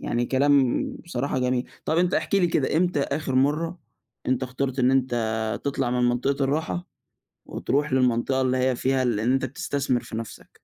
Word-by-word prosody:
يعني 120 Hz, +1 st, -1 dB
كلام 135 Hz, -1 st, +3 dB, 0.2 s
بصراحة 140 Hz, -5 st, -2 dB
جميل. 125 Hz, 0 st, 0 dB, 0.2 s
طب 160 Hz, -, +1 dB
أنت 180 Hz, 0 st, +2 dB
احكِ 160 Hz, +5 st, 0 dB
لي 190 Hz, -3 st, +4 dB
كده، 155 Hz, -3 st, 0 dB
إمتى 175 Hz, -3 st, +2 dB
آخر 140 Hz, -1 st, -2 dB
مَرّة 155 Hz, +6 st, +1 dB, 0.5 s
أنت 130 Hz, 0 st, +1 dB
اخترت 130 Hz, +1 st, -3 dB
إن 125 Hz, 0 st, +4 dB
أنت 130 Hz, -2 st, +1 dB, 0.5 s
تطلع 135 Hz, -3 st, -1 dB
من 125 Hz, 0 st, +2 dB
منطقة 135 Hz, +3 st, 0 dB
الراحة، 160 Hz, +5 st, -2 dB, 0.6 s
وتروح 145 Hz, +1 st, -1 dB
للمنطقة 130 Hz, 0 st, +2 dB
اللي 130 Hz, 0 st, +1 dB
هي 130 Hz, 0 st, +2 dB
فيها 130 Hz, +1 st, +1 dB
ال 120 Hz, -4 st, 0 dB
إن 115 Hz, +4 st, +1 dB
أنت 135 Hz, -, +1 dB
بتستثمر 130 Hz, -1 st, -1 dB
في 110 Hz, -, -6 dB
نَفسك؟ 115 Hz, 0 st, -8 dB
130 Hz, 175 wpm, -25 LUFS, 125-145 Hz, 0.6 s, لي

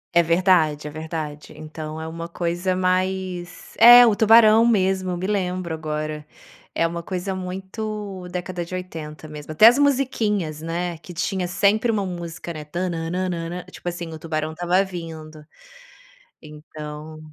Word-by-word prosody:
É 170 Hz, -, +7 dB
verdade, 165 Hz, -3 st, +2 dB
é -, -, -7 dB
verdade. 155 Hz, -1 st, -6 dB
Então 155 Hz, 0 st, -7 dB
é 160 Hz, -, -5 dB
uma 165 Hz, +1 st, -6 dB
coisa 175 Hz, +2 st, -1 dB
mais 185 Hz, -1 st, -2 dB
é, 240 Hz, +1 st, +10 dB
o 220 Hz, -, +3 dB
Tubarão 220 Hz, 0 st, +6 dB
mesmo, 190 Hz, -5 st, +2 dB
eu 180 Hz, -, -2 dB
me 185 Hz, -, -4 dB
lembro 185 Hz, -4 st, -2 dB
agora. 155 Hz, -1 st, -4 dB, 0.5 s
É 165 Hz, -, +2 dB
uma 170 Hz, +1 st, -3 dB
coisa 185 Hz, +2 st, -4 dB
muito 190 Hz, +1 st, -5 dB
década 180 Hz, 0 st, -4 dB
de 170 Hz, +2 st, -7 dB
80 160 Hz, -4 st, -7 dB
mesmo. 150 Hz, 0 st, -9 dB
Até 155 Hz, +8 st, +6 dB
as 245 Hz, +5 st, +8 dB
musiquinhas, 215 Hz, -, 0 dB
né, 170 Hz, 0 st, -3 dB
que 175 Hz, +1 st, -11 dB
tinha 185 Hz, +1 st, -1 dB
sempre 205 Hz, +5 st, +2 dB
uma 205 Hz, -3 st, -1 dB
música, 170 Hz, -1 st, -6 dB
né, 155 Hz, -1 st, -7 dB
"tana 165 Hz, +1 st, -3 dB
nan 185 Hz, +2 st, -1 dB
nan", 175 Hz, 0 st, -4 dB
tipo 175 Hz, -, -5 dB
assim, 175 Hz, -1 st, -6 dB
o 160 Hz, -, -8 dB
tubarão 155 Hz, -1 st, -3 dB
estava 175 Hz, +3 st, +1 dB
vindo. 160 Hz, -4 st, -8 dB, 1.0 s
Então 150 Hz, 0 st, -9 dB
175 Hz, 155 wpm, -23 LUFS, 160-190 Hz, 1.0 s, é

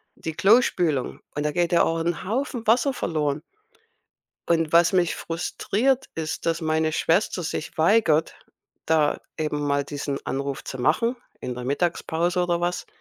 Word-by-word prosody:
die 160 Hz, -, -5 dB
Klospülung 175 Hz, -, +2 dB
und 145 Hz, -, -1 dB
da 150 Hz, -, 0 dB
geht 175 Hz, -1 st, +1 dB
ja 170 Hz, -, +5 dB
auch 165 Hz, 0 st, 0 dB
'n 170 Hz, +2 st, -2 dB
Haufen 235 Hz, +1 st, -2 dB
Wasser 250 Hz, +4 st, +3 dB
verloren. 150 Hz, -, -1 dB, 1.1 s
Und 165 Hz, -2 st, +1 dB
was 170 Hz, +3 st, +5 dB
mich 175 Hz, -3 st, +2 dB
frustriert, 215 Hz, +10 st, -1 dB
ist, 160 Hz, +1 st, -4 dB
dass 165 Hz, 0 st, +1 dB
meine 155 Hz, 0 st, +1 dB
Schwester 180 Hz, +3 st, +1 dB
sich 155 Hz, 0 st, -4 dB
weigert, 160 Hz, -2 st, +3 dB, 0.5 s
da 155 Hz, -2 st, +2 dB, 0.2 s
eben 150 Hz, -2 st, -2 dB
mal 140 Hz, 0 st, +1 dB
diesen 140 Hz, -1 st, -4 dB
Anruf 140 Hz, 0 st, -3 dB
zu 130 Hz, -, -7 dB
machen, 230 Hz, -, +2 dB, 0.2 s
in 125 Hz, -, -4 dB
der 125 Hz, -, -6 dB
Mittagspause 170 Hz, +4 st, 0 dB
oder 175 Hz, -1 st, 0 dB
was. 175 Hz, +1 st, -2 dB
165 Hz, 150 wpm, -24 LUFS, 150-180 Hz, 1.1 s, ja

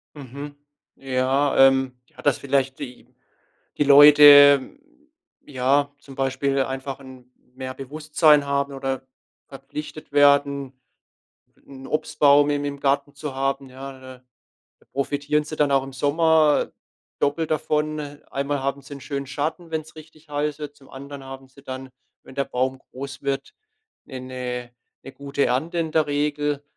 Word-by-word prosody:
Mhm. 140 Hz, +1 st, -9 dB, 0.4 s
Ja, 135 Hz, +2 st, 0 dB
ähm, 130 Hz, -1 st, 0 dB
ja, -, -, -15 dB
dass 145 Hz, -3 st, +2 dB
vielleicht 135 Hz, -1 st, -1 dB
die 125 Hz, -4 st, -9 dB, 0.7 s
die -, -, +3 dB
Leute, 145 Hz, -, +8 dB, 0.7 s
ja, 140 Hz, +2 st, +1 dB
zum 135 Hz, -1 st, -14 dB
Beispiel 135 Hz, 0 st, -1 dB
einfach 135 Hz, +1 st, -5 dB
'n 130 Hz, -2 st, -14 dB, 0.2 s
mehr 130 Hz, 0 st, -6 dB
Bewusstsein 150 Hz, +2 st, +2 dB
haben 140 Hz, 0 st, -1 dB
oder 135 Hz, -1 st, -4 dB, 0.4 s
verpflichtet 145 Hz, +3 st, -9 dB
werden, 140 Hz, -1 st, +3 dB, 0.9 s
'n 135 Hz, -1 st, -11 dB
Obstbaum 145 Hz, -1 st, +3 dB
im 145 Hz, 0 st, -1 dB
im 140 Hz, -1 st, -5 dB
Garten 140 Hz, +1 st, 0 dB
zu 140 Hz, -1 st, -6 dB
haben, 135 Hz, 0 st, -2 dB
ja, 135 Hz, +1 st, -9 dB
ne? 130 Hz, -1 st, -13 dB, 0.6 s
Da -, -, -27 dB
profitieren 145 Hz, +2 st, -1 dB
sie 155 Hz, +1 st, -7 dB
dann 145 Hz, -2 st, +1 dB
auch 135 Hz, -1 st, +3 dB
im 135 Hz, 0 st, -9 dB
Sommer 155 Hz, +2 st, +2 dB, 0.5 s
doppelt 155 Hz, +3 st, 0 dB
davon. 155 Hz, 0 st, -1 dB, 0.3 s
Einmal 140 Hz, 0 st, -2 dB
haben 140 Hz, +1 st, -2 dB
sie 140 Hz, -, -11 dB
'n 140 Hz, -, -11 dB
schönen 140 Hz, -2 st, -5 dB
Schatten, 155 Hz, +5 st, -4 dB
wenn's 160 Hz, 0 st, -5 dB
richtig 155 Hz, 0 st, -16 dB
heiß 145 Hz, 0 st, -2 dB
wird. 150 Hz, -1 st, -8 dB
Zum 135 Hz, -2 st, -20 dB
anderen 140 Hz, +1 st, -9 dB
haben 135 Hz, 0 st, -10 dB
sie 135 Hz, +1 st, -19 dB
dann, 130 Hz, -1 st, -7 dB, 0.3 s
wenn -, -, -14 dB
der 140 Hz, -1 st, 0 dB
Baum 130 Hz, +1 st, -2 dB
groß 140 Hz, +2 st, -9 dB
wird, 140 Hz, 0 st, -3 dB, 0.5 s
eine 125 Hz, -1 st, -6 dB, 0.3 s
'ne 135 Hz, -, -9 dB
gute 140 Hz, +1 st, -2 dB
Ernte 155 Hz, +8 st, -1 dB
in 160 Hz, -2 st, -1 dB
der 155 Hz, -1 st, +2 dB
Regel. 145 Hz, 0 st, -1 dB
140 Hz, 145 wpm, -23 LUFS, 135-145 Hz, 0.9 s, Leute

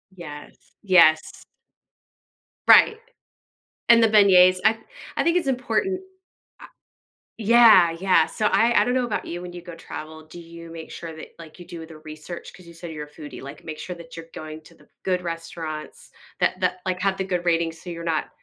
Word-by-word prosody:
Yes. 150 Hz, -5 st, -12 dB
Yes. 170 Hz, -5 st, +3 dB, 1.2 s
Right. 445 Hz, -, +7 dB, 0.9 s
And 235 Hz, 0 st, +7 dB
the -, -, +6 dB
beignets. 185 Hz, -4 st, +6 dB
I 220 Hz, +1 st, +4 dB, 0.4 s
I -, -, +2 dB
think 335 Hz, +1 st, +2 dB
it's 325 Hz, -, -2 dB
important 265 Hz, -, -1 dB, 0.6 s
I -, -, -11 dB, 0.7 s
Yeah, 220 Hz, -6 st, +6 dB
yeah. 185 Hz, -4 st, +3 dB
So, 215 Hz, -2 st, -1 dB
I 230 Hz, +3 st, +3 dB
I -, -, +1 dB
don't 245 Hz, -, 0 dB
know 255 Hz, -1 st, +1 dB
about 225 Hz, -, -3 dB
you, 175 Hz, +1 st, -6 dB
when 180 Hz, 0 st, -9 dB
you 175 Hz, -, -8 dB
go 175 Hz, -1 st, -10 dB
travel, 155 Hz, -1 st, -9 dB
do 160 Hz, +2 st, -12 dB
you 170 Hz, 0 st, -12 dB
make 165 Hz, -1 st, -9 dB
sure 165 Hz, -2 st, -8 dB
that, 155 Hz, -, -10 dB
like, 165 Hz, +1 st, -13 dB
you 175 Hz, -, -11 dB
do 165 Hz, -1 st, -8 dB
the 160 Hz, -1 st, -13 dB
research? 155 Hz, +2 st, -10 dB
'Cause 180 Hz, -2 st, -16 dB
you 170 Hz, -, -13 dB
say 165 Hz, 0 st, -9 dB
you're 150 Hz, -1 st, -6 dB
a -, -, -21 dB
foodie, 150 Hz, -1 st, -10 dB
like, 140 Hz, +1 st, -10 dB
make 155 Hz, -1 st, -7 dB
sure 180 Hz, -, -6 dB
that 165 Hz, 0 st, -12 dB
you're 165 Hz, 0 st, -9 dB
going 155 Hz, 0 st, -8 dB
to -, -, -18 dB
the -, -, -23 dB, 0.2 s
good 185 Hz, -1 st, 0 dB
restaurants 165 Hz, -2 st, -7 dB, 0.3 s
that -, -, 0 dB
that, 185 Hz, -, 0 dB
like, 185 Hz, -1 st, -2 dB
have 195 Hz, 0 st, 0 dB
the 190 Hz, -, -2 dB
good 180 Hz, -2 st, -3 dB
ratings 165 Hz, -1 st, 0 dB
so 180 Hz, -, -9 dB
you're 170 Hz, 0 st, -7 dB
not 165 Hz, -2 st, -2 dB
170 Hz, 200 wpm, -23 LUFS, 160-195 Hz, 1.2 s, Right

